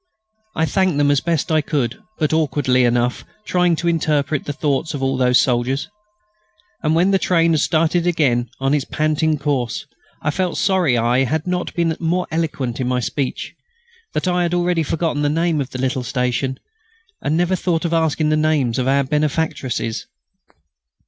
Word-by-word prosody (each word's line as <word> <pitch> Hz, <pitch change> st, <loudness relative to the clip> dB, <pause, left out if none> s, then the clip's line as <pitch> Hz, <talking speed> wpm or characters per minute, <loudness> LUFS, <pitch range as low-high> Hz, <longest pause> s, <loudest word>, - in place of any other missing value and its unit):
I 160 Hz, -, +2 dB
thanked 185 Hz, +1 st, +1 dB
them 145 Hz, 0 st, +3 dB
as 145 Hz, -, +2 dB
best 165 Hz, -2 st, -1 dB
I 155 Hz, -1 st, +3 dB
could, 145 Hz, -, -2 dB, 0.2 s
but 155 Hz, -1 st, 0 dB
awkwardly 140 Hz, -5 st, +2 dB
enough, 120 Hz, +1 st, +1 dB, 0.2 s
trying 180 Hz, -2 st, +2 dB
to 170 Hz, -, -3 dB
interpret 155 Hz, -3 st, 0 dB
the -, -, -2 dB
thoughts 150 Hz, +2 st, -1 dB
of 135 Hz, -, -4 dB
all 135 Hz, 0 st, +1 dB
those 125 Hz, -1 st, +3 dB
soldiers. 125 Hz, +2 st, 0 dB, 0.9 s
And 155 Hz, 0 st, +1 dB
when 180 Hz, +4 st, +3 dB
the 195 Hz, -, +3 dB
train 170 Hz, -3 st, +2 dB
had 160 Hz, -, +2 dB
started 165 Hz, +3 st, +1 dB
again 125 Hz, -8 st, +1 dB
on 135 Hz, +1 st, +1 dB
its 145 Hz, -2 st, +1 dB
panting 155 Hz, +1 st, 0 dB
course, 135 Hz, -5 st, -2 dB, 0.4 s
I 150 Hz, -, +1 dB
felt 180 Hz, +2 st, -1 dB
sorry 185 Hz, -10 st, +2 dB
I 120 Hz, +3 st, +2 dB
had 155 Hz, +4 st, -1 dB
not 180 Hz, 0 st, -2 dB
been 165 Hz, -2 st, +1 dB
more 175 Hz, +2 st, 0 dB
eloquent 145 Hz, -7 st, -2 dB
in 125 Hz, -, -1 dB
my 125 Hz, 0 st, +1 dB
speech; 130 Hz, +2 st, -3 dB, 0.6 s
that -, -, -1 dB
I 180 Hz, 0 st, +1 dB
had 175 Hz, 0 st, 0 dB
already 175 Hz, -1 st, +1 dB
forgotten 160 Hz, -1 st, -1 dB
the 145 Hz, -, +2 dB
name 165 Hz, 0 st, +1 dB
of 135 Hz, -, -4 dB
the 130 Hz, -, -7 dB
little 130 Hz, +1 st, -1 dB
station, 125 Hz, +2 st, -1 dB, 0.6 s
and 155 Hz, +2 st, 0 dB
never 175 Hz, +2 st, +2 dB
thought 175 Hz, -2 st, -1 dB
of 170 Hz, -, -1 dB
asking 160 Hz, -1 st, +1 dB
the 155 Hz, -, +3 dB
names 150 Hz, -6 st, +1 dB
of 130 Hz, -, 0 dB
our 140 Hz, +1 st, +3 dB
benefactresses. 140 Hz, -5 st, -1 dB
150 Hz, 180 wpm, -20 LUFS, 130-165 Hz, 0.9 s, them